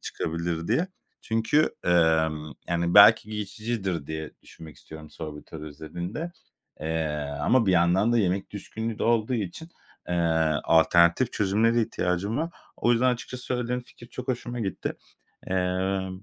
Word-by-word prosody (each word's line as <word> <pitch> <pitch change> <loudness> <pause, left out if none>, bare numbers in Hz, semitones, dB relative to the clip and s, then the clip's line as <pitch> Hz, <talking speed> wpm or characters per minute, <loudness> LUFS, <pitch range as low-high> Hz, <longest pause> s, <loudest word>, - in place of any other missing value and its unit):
çıkabilir 85 +1 -3
diye. 150 +12 +1 0.3
Çünkü, 115 +7 +2
emm, 80 -3 +2 0.2
yani, 85 0 0
belki 105 +1 +8
geçicidir 105 -5 -3
diye 80 -1 -5
düşünmek 80 -3 -13
istiyorum 80 -1 -12
sorbitol 75 0 -8
özelinde, 85 - -6 0.5
eee, 80 0 -1 0.3
ama 120 +8 +3
bir 95 - +4
yandan 90 +6 +3
da 120 - +3
yemek 95 -1 0
düşkünlüğü 110 +2 -5
de - - -3
olduğu 115 +1 +2
için, 110 - -4 0.4
eee, 90 - -1 0.5
alternatif 85 +8 +4
çözümlere 110 +4 +2
ihtiyacım 95 +4 -1
var. 165 +2 -1 0.3
O 120 - +2
yüzden 125 +2 +3
açıkçası 125 +1 -8
söylediğin 125 0 -2
fikir 120 -1 -15
çok 125 0 -8
hoşuma 120 -1 -3
gitti. 95 -4 -3 0.6
Eee, 95 +1 0
95 Hz, 135 wpm, -26 LUFS, 85-115 Hz, 0.6 s, belki